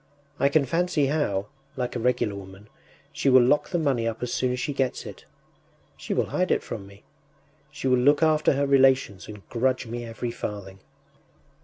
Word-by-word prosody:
I 140 - +3
can 140 0 +3
fancy 170 +1 +1
how, 135 -10 0 0.3
like 125 -1 -3
a - - -1
regular 120 -3 0
woman, 100 +1 -11 0.4
she 140 - +1
will 130 -1 +7
lock 140 +4 +2
the 175 - 0
money 135 -8 0
up 115 +1 -4
as 125 0 -3
soon 130 0 0
as 125 - -3
she 145 - -2
gets 135 -2 -2
it.... - - -10 0.7
She - - -8
will - - +1
hide - - 0
it - - +1
from 100 - -7
me.... 100 +1 -17 0.7
She - - -5
will 125 -1 +3
look 145 +5 +4
after 155 -1 +3
her 140 +1 0
relations 135 -7 +3
and 105 -2 -11
grudge 130 +2 0
me 120 +1 -5
every 115 +1 -5
farthing. 100 -4 -7
125 Hz, 190 wpm, -25 LUFS, 110-140 Hz, 0.7 s, will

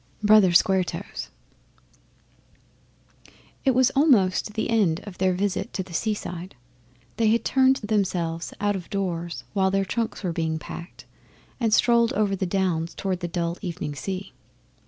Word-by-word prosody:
Brother 210 -3 +6
Square 185 +2 +4
Toes - - -6 2.3
It 265 -3 +3
was 260 0 +4
almost 215 - +3
the 220 - -1
end 190 -8 +2
of 205 -4 -11
their 185 0 +2
visit 200 +4 -2
to 190 - -2
the 180 -1 -13
seaside. 185 -2 -3 0.6
They 225 - +2
had 230 +2 +2
turned 265 0 +4
themselves 180 -6 -1
out 205 0 +1
of 180 -3 -7
doors 175 -4 -3
while 190 -2 +2
their 195 0 +1
trunks 230 +3 -3
were 175 -3 -1
being 160 -1 -1
packed, 170 +3 -9 0.5
and 230 -3 +1
strolled 235 +2 +4
over 205 -4 +1
the 190 -1 -2
Downs 175 -3 -1
towards 190 -2 -2
the 175 - -2
dull 170 0 -2
evening 175 -6 -4
sea. 190 +6 -5
190 Hz, 150 wpm, -25 LUFS, 175-215 Hz, 2.3 s, Brother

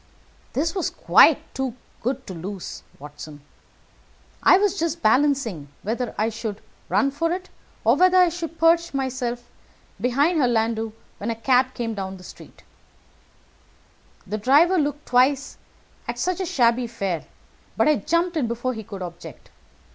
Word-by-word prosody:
"This 325 +4 0
was 370 -4 -1
quite - - +4
too 265 -3 -3 0.3
good 260 +3 -2
to 190 - -7
lose, 185 +2 -7 0.2
Watson. 145 +1 -10 1.0
I 370 - +7
was 400 -1 +1
just 335 0 -2
balancing 240 - +2 0.2
whether 235 +3 -3
I 220 +1 +1
should 220 -2 -5 0.3
run 275 0 +2
for 330 +4 -1
it, 365 +1 -4 0.3
or - - +5
whether 370 0 +5
I 360 -1 +6
should 330 -1 -6
perch 335 0 +3
behind 260 +3 -2
her 260 - +3
landau, 225 -1 0 0.3
when 205 - -3
a 230 - -1
cab 255 +2 +2
came 230 -2 -3
through 190 -1 -5
the 180 - -14
street. - - -14 1.6
The 210 +2 -4
driver 310 - +4
looked 290 0 -2
twice 260 +3 +2 0.5
at - - -4
such 365 0 -1
a 375 - -2
shabby 240 -3 +2
fare; 195 -8 -3 0.5
but - - +3
I 305 - +4
jumped 335 - 0
in 285 -7 0
before 240 +2 -2
he 220 -2 -7
could 195 -2 -7
object. 175 -1 -10
255 Hz, 150 wpm, -23 LUFS, 220-320 Hz, 1.6 s, I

